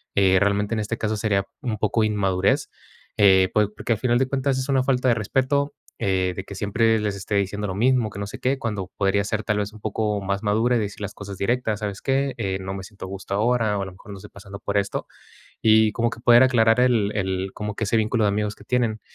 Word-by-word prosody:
Eh, 95 -1 +4
realmente 100 +2 +1
en - - -1
este 105 -1 -3
caso 110 0 -1
sería 100 -3 0 0.2
un 120 -6 -2
poco 110 +2 +1
inmadurez. 105 +5 +1 0.5
Eh, 95 -2 +5
po 105 -1 +3
porque - - -4
al 110 - -4
final 120 -2 +2
de 135 - +1
cuentas 135 0 0
es 130 +1 -3
una 135 -1 +3
falta 130 -1 +1
de 120 - +4
respeto, 135 +6 0 0.3
eh, 95 -2 0
de 95 - -6
que 100 - -9
siempre 110 +3 +2
les 105 -1 -2
esté 100 +1 -4
diciendo 100 +1 -1
lo 95 - -4
mismo, 120 +1 +2
que 100 - -11
no 100 - -3
sé - - -8
qué, 135 +2 0
cuando 105 -7 -4
podría 100 0 +2
ser 110 +1 -2
tal 110 -2 0
vez 105 0 -3
un 110 - -14
poco 105 -1 -1
más 100 +1 -2
madura 110 +4 +2
y - - +1
decir 105 -1 -5
las 100 -1 -4
cosas 100 -1 -8
directas: 110 0 -1
"¿Sabes 100 -2 -4
qué? 135 0 0
Eh, 95 -4 -2
no 95 0 -5
me 95 -1 -6
siento 100 -1 -10
a - - -7
gusto 95 0 -6
ahora", 110 -1 +1
o, - - -2
a - - -4
lo 95 - -8
mejor 100 +3 -14
¿no?, 100 - -7
"Estoy 95 - -12
pasando 100 -1 -11
por 100 0 -2
esto". 100 -1 -1 0.6
Y 110 -1 +5
como 115 0 0
que 115 - -9
poder 120 +1 +6
aclarar 115 -2 +4
el 115 -5 +2
el 95 -1 -2
como 105 -1 -4
que 110 - -1
ese 110 +2 +1
vínculo 110 0 +1
de - - +3
amigos 105 +1 -1
que - - -16
tienen. 115 -2 0
105 Hz, 255 wpm, -23 LUFS, 100-115 Hz, 0.6 s, poder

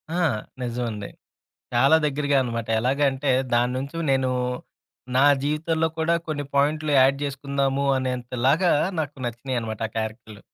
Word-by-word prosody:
ఆ! - - 0 0.4
నిజమండి. 120 -4 -3 0.7
చాలా 135 +6 +5
దగ్గరగా 145 -1 +1
అనమాట. 115 -2 -4
ఎలాగంటే, 135 +2 +1 0.2
దాని 120 +1 +2
నుంచి 140 +5 -5
నేను 130 -1 +2 0.9
నా 135 - +5 0.2
జీవితంలో 160 +2 0
కూడా 165 +1 +2
కొన్ని 145 -2 -3
పాయింట్లు 150 +2 +1
యాడ్ 135 +1 +5
జేసుకుందాము 140 0 -1
అనేంతలాగా 130 +6 +1 0.3
నాకు 150 -1 -4
నచ్చినియనమాట 120 -2 -4
ఆ - - -25
క్యారెక్టర్లు. 110 -1 -5
135 Hz, 120 wpm, -24 LUFS, 120-145 Hz, 0.9 s, చాలా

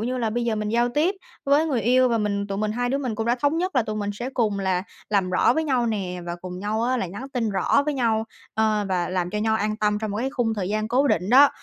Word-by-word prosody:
như 250 +3 -2
là 230 -3 0
bây 240 +2 -1
giờ 230 -2 0
mình 210 0 -2
giao 235 +2 +2
tiếp 305 +10 +1 0.3
với 285 +3 +3
người 270 -7 0
yêu, 255 +2 +4
và 230 -1 +1
mình 200 -1 -1
tụi 195 -1 -4
mình 215 0 0
hai 245 +2 -1
đứa 270 +3 0
mình 255 -5 -2
cũng 225 +1 -3
đã 240 - +3
thống 290 +3 +2
nhất 365 -2 -1
là 250 - +4
tụi 215 -1 -4
mình 205 -1 -2
sẽ 240 +5 -5
cùng 220 -6 0
là 190 -2 0 0.3
làm 195 -3 +1
rõ 185 - +4
với 320 - 0
nhau 255 -5 +1
nè, 190 -5 -2
và 170 0 -4
cùng 180 0 -7
nhau 210 +3 -1
á 255 +2 +1
là 210 - -1
nhắn 205 +10 -7
tin 235 -5 0
rõ 195 +8 +2
với 300 0 -1
nhau, 225 -4 +1 0.3
ờ, 215 -1 +1
và 180 -2 0
làm 180 -1 -1
cho 210 - -2
nhau 220 +1 +1
an 215 0 -1
tâm 210 -1 +1
trong 215 0 -3
một 200 - -3
cái 255 +5 -1
khung 235 -4 0
thời 190 -4 -3
gian 215 +1 -1
cố 260 +5 +3
định 180 -1 +1
đó, 275 +3 +8
220 Hz, 300 wpm, -24 LUFS, 205-250 Hz, 0.3 s, đó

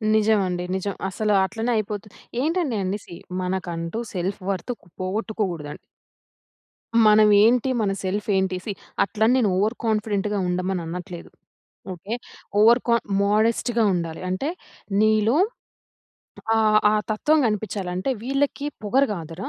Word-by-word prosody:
నిజమండి, 200 -5 +2
నిజం. 195 +1 -2
అసల 210 +3 -1
అట్లనే 225 +5 -2
అయిపోతుది. 210 -1 -4 0.3
ఏంటండి 320 -4 0
అంటే, 190 +3 -2
సీ, 170 - -10 0.3
మనకంటూ 180 0 -3
సెల్ఫ్ 185 +1 -2
వర్త్‌కు 195 +3 -4
పోగొట్టుకోగూడదండి. 185 -5 -3 1.3
మనం 215 0 +6 0.2
ఏంటి, 245 +3 +3
మన 200 -2 +1
సెల్ఫ్ 200 +2 -2
ఏంటి 190 -1 +1
సీ, 215 - -2 0.3
అట్లని 220 +4 +2
నేను 230 -6 +3
ఓవర్ 215 +5 +1
కాన్ఫిడెంట్‌గా 210 -2 0
ఉండమని 180 +1 -1
అనట్లేదు, 175 +1 -7 0.6
ఓకే. 190 +5 -5 0.5
ఓవర్ 235 +3 +6
కాన్ 235 -1 +3 0.2
మోడెస్ట్‌గా 225 +3 +2
ఉండాలి. 165 -2 -3
అంటే, 185 +10 -1 0.5
నీలో 215 +3 +3 1.2
ఆ, - - +3 0.3
ఆ - - +2 0.2
తత్వం 295 +9 +2
గనిపిచ్చాలి. 210 -3 -2
అంటే, 185 +9 -1
"వీళ్ళకి 275 +3 -1 0.2
పొగరు 255 +7 +3
గాదురా! 170 -1 -5
210 Hz, 120 wpm, -23 LUFS, 185-225 Hz, 1.3 s, మనం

